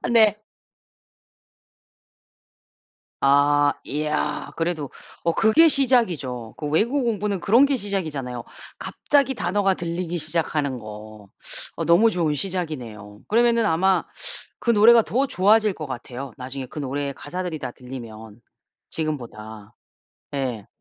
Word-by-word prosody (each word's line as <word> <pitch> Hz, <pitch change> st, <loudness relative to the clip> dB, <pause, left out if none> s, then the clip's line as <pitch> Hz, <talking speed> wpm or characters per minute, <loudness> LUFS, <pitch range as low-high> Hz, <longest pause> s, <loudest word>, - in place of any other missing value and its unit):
네. 215 Hz, -3 st, +5 dB, 2.8 s
아 145 Hz, +1 st, +4 dB
이야 150 Hz, +1 st, -2 dB
그래도 165 Hz, -4 st, -2 dB, 0.3 s
어 170 Hz, 0 st, +2 dB
그게 225 Hz, +10 st, +5 dB
시작이죠. 175 Hz, -, +1 dB
그 150 Hz, -, -4 dB
외국어 235 Hz, -, +1 dB
공부는 210 Hz, -4 st, -1 dB
그런 235 Hz, +7 st, +5 dB
게 280 Hz, -, +1 dB
시작이잖아요. 155 Hz, -, -4 dB, 0.3 s
갑자기 275 Hz, -2 st, +1 dB
단어가 195 Hz, +1 st, +1 dB
들리기 175 Hz, 0 st, -3 dB
시작하는 155 Hz, -4 st, -1 dB
거. 105 Hz, -1 st, -10 dB, 0.5 s
어 -, -, -3 dB
너무 210 Hz, +7 st, +5 dB
좋은 165 Hz, -4 st, 0 dB
시작이네요. 130 Hz, -, -5 dB
그러면은 235 Hz, 0 st, +3 dB
아마 190 Hz, +2 st, +2 dB, 0.6 s
그 235 Hz, -, +2 dB
노래가 230 Hz, +2 st, +7 dB
더 265 Hz, +6 st, 0 dB
좋아질 210 Hz, +1 st, +3 dB
것 155 Hz, -, -6 dB
같아요. 130 Hz, 0 st, -7 dB
나중에 130 Hz, +1 st, -6 dB
그 150 Hz, -, -8 dB
노래의 140 Hz, 0 st, -3 dB
가사들이 175 Hz, +2 st, -5 dB
다 125 Hz, -2 st, -5 dB
들리면 115 Hz, -4 st, -10 dB, 0.5 s
지금보다. 110 Hz, -9 st, -5 dB, 0.6 s
예. 125 Hz, -7 st, -3 dB
155 Hz, 265 characters per minute, -23 LUFS, 130-205 Hz, 2.8 s, 노래가